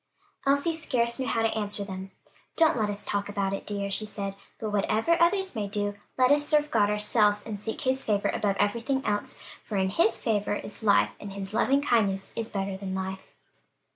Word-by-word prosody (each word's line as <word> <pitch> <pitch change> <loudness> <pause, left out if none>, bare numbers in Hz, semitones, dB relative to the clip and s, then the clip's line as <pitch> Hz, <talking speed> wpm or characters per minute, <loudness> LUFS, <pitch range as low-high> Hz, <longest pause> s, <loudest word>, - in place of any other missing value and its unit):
Elsie 285 +4 +2
scarce 235 -7 0
knew 260 - -1
how 225 - +1
to 225 - +1
answer 205 -1 -1
them. 190 -1 -6 0.5
"Don't 325 -2 +4
let 215 -3 0
us 205 0 -4
talk 205 0 -1
about 200 -1 -1
it, 195 - -5
dears," 200 -1 -2
she 215 +2 +3
said: 200 -2 -4 0.2
"but 215 -1 -4
whatever 215 +9 +2
others 380 -1 +2
may 210 -2 -2
do, 205 0 -1 0.2
let 255 +1 +5
us 290 0 +4
serve 300 0 +2
God 205 -3 +3
ourselves 210 0 +2
and 210 -3 -5
seek 220 +8 -4
his 265 -1 0
favor 205 -2 +1
above 200 -2 0
everything 235 +6 0
else; 205 0 -2 0.2
for 210 - -4
'in 190 0 +2
his 220 +3 +2
favor 210 -2 0
is 210 - -6
life' 205 -2 +4
and 200 -1 -7
his 195 0 -6
loving 270 +5 +3
kindness 200 -7 +1
is 230 -1 -3
better 195 -1 -2
than 190 -1 -4
life." 190 0 -4
210 Hz, 200 wpm, -27 LUFS, 200-240 Hz, 0.5 s, let